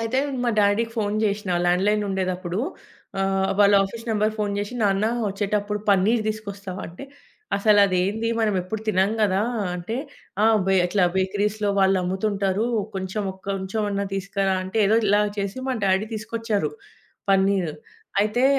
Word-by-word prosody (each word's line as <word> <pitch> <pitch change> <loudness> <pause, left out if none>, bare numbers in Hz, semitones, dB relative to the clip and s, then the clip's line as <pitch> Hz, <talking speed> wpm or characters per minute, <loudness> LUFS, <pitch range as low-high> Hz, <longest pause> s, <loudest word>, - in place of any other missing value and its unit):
అయితే 230 +3 0 0.3
మా 240 - +2
డ్యాడీకి 210 +3 +2
ఫోను 210 -1 0
చేసినా 205 -2 -1
ల్యాండ్ 180 +2 +2
లైనుండేటప్పుడు. 190 -3 -1 0.6
ఆహ్, 195 0 +1
వాళ్ల 200 0 +6
ఆఫీసు 230 +4 -8
నంబర్‌కి 215 0 +1
ఫోను 205 -1 -1
చేసి, 205 +4 -4
నాన్న, 200 +1 +2 0.2
వచ్చేటప్పుడు 205 +1 -1
పనీర్ 205 +4 +3
తీసుకొస్తావా, 200 -3 -5
అంటే, 180 +11 -10 0.5
"అసలు 205 +1 +4
అది 185 -2 +1
ఏంది, 220 +4 -1
మనం 215 -2 +2
ఎప్పుడు 210 +4 -5
తినము 195 +2 +2
కదా!" 195 -1 +2 0.4
అంటే, 200 +7 -4 0.5
ఆ! - - +6 0.2
బే 195 0 +3
అట్లా 185 0 +2
బేకరీస్‌లో 205 +2 0
వాళ్లమ్ముతుంటారు. 195 +2 +1 0.3
కొంచెం, 190 +3 -3
ఒక 190 - -20
కొంచెం 195 +2 -2
అన్న 200 0 -1
తీసుకురా 195 0 -1
అంటే, 190 +4 -3
ఏదో 220 +3 +4
ఇలా 205 +1 +4 0.2
చేసి 200 +5 -3
మ 260 - 0
డ్యాడీ 195 +3 +2
తీసుకొచ్చారు 220 -6 -2 0.6
పన్నీరు. 190 -5 +2 0.5
అయితే 215 +5 +1
200 Hz, 145 wpm, -24 LUFS, 190-215 Hz, 0.6 s, వాళ్ల